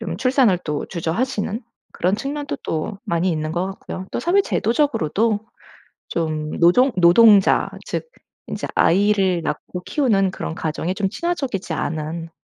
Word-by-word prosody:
좀 225 - -4
출산을 255 -7 +3
또 150 -2 -3
주저하시는 205 +6 -2 0.3
그런 185 +3 0
측면도 280 +4 -4
또 180 +6 -3
많이 170 +2 0
있는 155 -1 -2
것 175 +2 -1
같고요. 190 -1 -7
또 - - -3
사회 360 +4 +3
제도적으로도 225 - +1 0.7
좀 155 -2 -2
노동 245 +11 +5
노동자 195 +3 +6 0.2
즉 480 - -4 0.4
인제 - - -4
아이를 195 -1 +3
낳고 170 +4 -4
키우는 205 -10 +2
그런 165 - -5
가정에 160 +3 -2
좀 195 0 0
친화적이지 275 - -3
않은 165 +1 -3
195 Hz, 305 characters per minute, -21 LUFS, 170-235 Hz, 0.7 s, 노동자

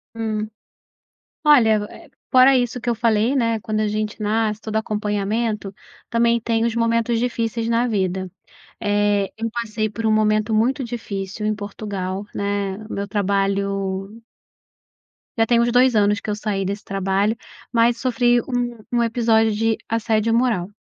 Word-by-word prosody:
Hum, 215 -1 -2 1.0
olha, 225 -8 +5
eh, 330 -5 -14 0.2
fora 260 +1 +6
isso 245 0 -1
que 240 - -5
eu 240 - +2
falei, 225 +2 +2
né, 230 -4 +1
quando 215 0 -2
a 215 - +1
gente 215 +1 -3
nasce 215 0 0
todo 220 -1 -4
acompanhamento, 210 -1 -1 0.3
também 235 0 +2
tem 230 0 0
os 235 0 -1
momentos 230 0 +1
difíceis 230 -1 -1
na 235 +1 +2
vida. 190 -3 -1 0.5
Eh, 205 -1 +1
eu 225 +1 -3
passei 220 -2 -2
por 225 +1 -4
um 220 - +3
momento 215 0 +2
muito 255 +5 +1
difícil, 210 -4 -5
em 215 0 +1
Portugal, 200 -1 -5
né, 200 -1 -2
o - - -8
meu 200 0 -3
trabalho 195 +1 -1 1.2
já 225 - +4
tem 235 +1 +3
uns 235 0 +2
2 250 0 +4
anos 205 -1 +3
que - - -7
eu 210 - 0
saí 205 -2 -2
desse 200 +2 -4
trabalho, 195 +2 0 0.4
mas 235 0 +3
sofri 245 -1 +2
um 240 -2 -3
um 240 -1 +2
episódio 225 -1 +2
de 225 +1 +1
assédio 225 0 +1
moral, 225 -7 +1
220 Hz, 155 wpm, -21 LUFS, 205-235 Hz, 1.2 s, fora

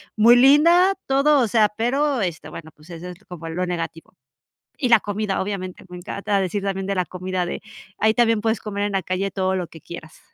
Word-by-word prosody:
muy 230 +3 +6
linda, 335 +9 +5
todo, 275 +2 +3
o 240 - +2
sea, 215 0 +3
pero, 265 +2 0
este, 165 -4 -4
bueno, 160 0 -10
pues, 150 +3 -19
eso 170 +1 -8
es 180 +4 -12
como 170 -2 -9
lo 180 +2 -2
negativo. 165 -2 -5 0.7
Y 250 - 0
la 230 - +7
comida, 205 -1 -3
obviamente, 190 -2 -6
me 180 - -9
encanta 200 +2 -2
decir 195 +2 -2
también 195 -1 -3
de 200 - -1
la 180 - 0
comida 185 0 -3
de - - -5 0.4
ahí 220 +1 +3
también, 230 -3 +3
puedes 225 +1 0
comer 205 -1 -3
en 205 - -3
la 190 -2 0
calle 185 +3 -2
todo 190 -1 -1
lo 180 -3 -3
que 160 - -14
quieras. 160 -2 -11
195 Hz, 215 wpm, -22 LUFS, 180-230 Hz, 0.7 s, la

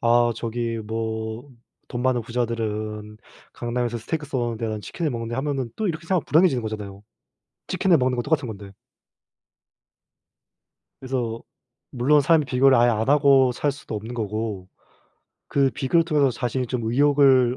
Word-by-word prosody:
'아 120 0 +3
저기 115 0 -3
뭐 110 +3 -4 0.4
돈 120 -1 -3
많은 130 -1 +2
부자들은 110 -2 -3 0.4
강남에서 120 0 -2
스테이크 150 +7 -4
써는데 120 -4 -2
나는 110 -1 -4
치킨을 160 - -3
먹는데.' 115 -1 -4
하면은 135 -3 -2
또 215 - -1
이렇게 165 -1 -3
생각하면 185 -3 +1
불행해지는 155 -5 +4
거잖아요. 105 -2 -6 0.7
치킨을 180 -4 +3
먹는 125 -1 +1
건 - - +1
똑같은 145 -1 0
건데. 100 -2 -8 2.3
그래서 125 -3 -3 0.5
물론 140 +4 +3
사람이 155 +1 +3
비교를 130 0 +4
아예 120 +1 +5
안 110 +1 0
하고 140 -3 +5
살 145 +4 -1
수도 135 -5 -8
없는 110 +3 -6
거고 105 -4 -4 0.8
그 140 -1 +2
비교를 160 +7 +1
통해서 145 -5 +2
자신이 125 +1 -2
좀 125 0 -3
의욕을 135 -2 +4
120 Hz, 335 characters per minute, -23 LUFS, 115-140 Hz, 2.3 s, 아예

